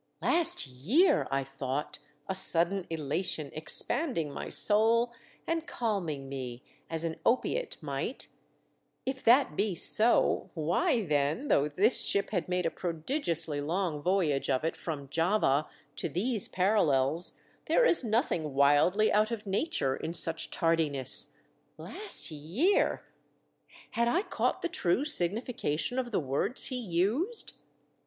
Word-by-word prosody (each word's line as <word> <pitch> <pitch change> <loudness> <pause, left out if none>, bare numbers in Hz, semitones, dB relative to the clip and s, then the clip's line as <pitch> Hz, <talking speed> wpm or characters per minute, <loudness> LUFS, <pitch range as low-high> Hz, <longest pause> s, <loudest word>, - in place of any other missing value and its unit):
Last 335 - +2
year! 175 - +2
I 135 0 -1
thought, 135 +1 -5 0.3
a 190 - -1
sudden 185 0 +2
elation 155 -1 -3
expanding 160 - -1
my - - -6
soul 230 +3 +2 0.3
and 330 0 -2
calming 175 - -3
me 130 -2 -7 0.3
as 165 0 +1
an 160 -1 -3
opiate 475 - 0
might; - - -4 0.8
if 265 0 -4
that 245 - +4
be 200 0 0
so 220 +7 +3
why, 205 - 0
then, 150 - -1
though 140 - +3
this 200 - +2
ship 200 0 +1
had 180 -4 -2
made 180 -1 0
a 165 - 0
prodigiously 165 - -2
long 165 0 -2
voyage 170 -6 0
of 130 - +1
it 160 - -1
from 145 -4 -6
Java 165 -2 +1 0.3
to - - -3
these 215 +3 -2
parallels, 170 -6 +1 0.3
there - - +3
is 345 - +5
nothing 210 - -1
wildly 145 +10 +3
out 215 +1 +3
of 230 -3 -5
nature 190 - -1
in 165 - -5
such 165 -1 +3
tardiness. 155 -6 +2 0.4
Last 405 - -1
year! 175 - 0 0.9
Had 235 0 0
I 345 +11 +1
caught - - -2
the - - +1
true 275 - 0
siQ:nification 225 - 0
of 250 -2 -3
the 215 - 0
words 145 - -2
he 260 - -4
used 235 - -1
180 Hz, 135 wpm, -29 LUFS, 150-235 Hz, 0.9 s, is